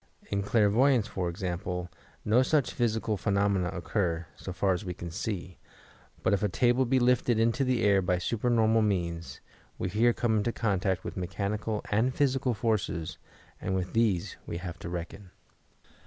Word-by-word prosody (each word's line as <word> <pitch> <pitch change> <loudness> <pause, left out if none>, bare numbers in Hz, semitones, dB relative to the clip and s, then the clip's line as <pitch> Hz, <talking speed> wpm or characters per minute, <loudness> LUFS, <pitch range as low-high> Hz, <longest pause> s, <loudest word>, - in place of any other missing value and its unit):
In 100 0 +1
clairvoyance, 110 +4 +3
for 95 -4 -2
example, 90 0 -3 0.4
no 110 +4 +4
such 140 +1 +2
physical 110 -3 0
phenomeoA 100 -2 +1
occur, 85 -1 -1
so 95 - -7
far 95 +1 +1
as 90 - -3
we 90 -3 -5
can 85 -1 -7
see; 90 -1 -4 0.6
but 95 - +3
if 100 - +1
a 105 - +1
table 125 +6 +3
be 130 +2 +2
lifted 125 -2 +3
into 115 +4 +2
the 125 -2 +1
air 100 -2 +4
by 90 -1 +1
supernormal 115 +2 +2
means, 85 -5 -2 0.4
we 95 - -2
here 115 +5 +3
come 115 -2 +1
into 105 +3 +1
contact 95 -5 0
with - - -6
mechanical 100 +4 -2
and 115 +5 +2
physical 135 -3 +1
forces 105 -7 -1 0.4
and 95 - -1
with 90 -1 -2
these 110 -7 +1
we - - -3
have 90 -1 -6
to - - -6
reckon. 90 +2 -6
105 Hz, 165 wpm, -29 LUFS, 90-115 Hz, 0.6 s, no